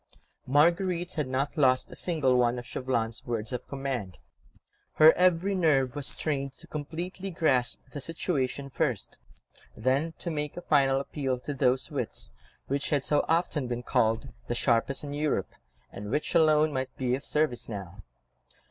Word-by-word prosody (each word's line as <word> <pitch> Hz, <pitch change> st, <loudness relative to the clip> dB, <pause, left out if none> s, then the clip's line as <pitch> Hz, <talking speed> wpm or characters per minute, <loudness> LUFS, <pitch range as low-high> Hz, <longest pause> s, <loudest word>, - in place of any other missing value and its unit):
Marguerite 170 Hz, +5 st, +2 dB
had 150 Hz, -5 st, -1 dB
not 135 Hz, +4 st, -1 dB
lost 130 Hz, -4 st, +3 dB
a -, -, -8 dB
single 150 Hz, -8 st, +1 dB
one 125 Hz, 0 st, +3 dB
of 120 Hz, -, -6 dB
Chauvelin's 115 Hz, -3 st, -2 dB
words 115 Hz, 0 st, -3 dB
of 125 Hz, -, -4 dB
command. 130 Hz, -, -4 dB, 0.8 s
Her 155 Hz, +1 st, +8 dB
every 185 Hz, +2 st, +3 dB
nerve 145 Hz, -8 st, +2 dB
was 145 Hz, -2 st, -1 dB
strained 140 Hz, -3 st, -2 dB
to 170 Hz, -, -9 dB
completely 170 Hz, +5 st, -5 dB
grasp 135 Hz, -8 st, +1 dB
the 145 Hz, -, -4 dB
situation 140 Hz, -4 st, -1 dB
first, -, -, -2 dB, 0.6 s
then 135 Hz, +8 st, +1 dB
to 170 Hz, -, -5 dB
make 150 Hz, 0 st, -3 dB
a -, -, -4 dB
final 135 Hz, -5 st, +3 dB
appeal 135 Hz, -2 st, -2 dB
to 145 Hz, -, -4 dB
those 130 Hz, -1 st, +1 dB
wits -, -, -3 dB, 0.3 s
which 140 Hz, +1 st, -2 dB
had 145 Hz, -3 st, +1 dB
so 150 Hz, -, +2 dB
often 165 Hz, -4 st, +1 dB
been 120 Hz, 0 st, -3 dB
called 120 Hz, +1 st, +1 dB, 0.2 s
the 120 Hz, -, -1 dB
sharpest 120 Hz, +3 st, +1 dB
in 145 Hz, -1 st, -5 dB
Europe, 150 Hz, +1 st, -1 dB, 0.4 s
and 105 Hz, +1 st, -7 dB
which 145 Hz, +6 st, -1 dB
alone 155 Hz, -2 st, +4 dB
might 130 Hz, -1 st, -3 dB
be 125 Hz, -2 st, 0 dB
of 135 Hz, +3 st, -2 dB
service 150 Hz, -7 st, 0 dB
now. 100 Hz, -3 st, -7 dB
140 Hz, 160 wpm, -28 LUFS, 125-155 Hz, 0.8 s, Her